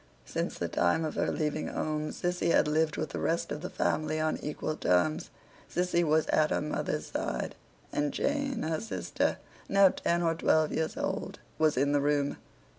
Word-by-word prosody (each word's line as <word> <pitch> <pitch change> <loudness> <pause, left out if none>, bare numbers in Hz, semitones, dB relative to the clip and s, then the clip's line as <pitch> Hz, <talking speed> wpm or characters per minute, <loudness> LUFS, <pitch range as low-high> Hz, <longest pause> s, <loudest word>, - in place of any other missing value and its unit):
Since - - -3
the - - -1
time 85 - +2
of 155 - -3
her - - 0
leaving 155 0 -1
home, 155 0 -2
Sissy 180 -1 -1
had - - +4
lived 155 0 +1
with 155 - -2
the - - -4
rest 165 +1 0
of 150 - -3
the 180 - -4
family 155 0 0
on 155 0 +1
equal 150 +1 -3
terms. 90 - +1 0.4
Sissy 175 0 +2
was 155 0 +3
at 155 0 +3
her - - +1
mother's 150 - -2
side; - - -3 0.4
and 145 0 +1
Jane, 280 -3 -1
her 160 0 -1
sister, 225 - -1 0.3
now 195 -1 +7
ten 170 -1 0
or 165 -1 +3
twelve 160 -1 +2
years 160 0 -1
old, - - -3 0.2
was 155 -4 +3
in 140 +2 +3
the 145 -1 +3
room. 145 0 +1
155 Hz, 185 wpm, -30 LUFS, 150-170 Hz, 0.4 s, now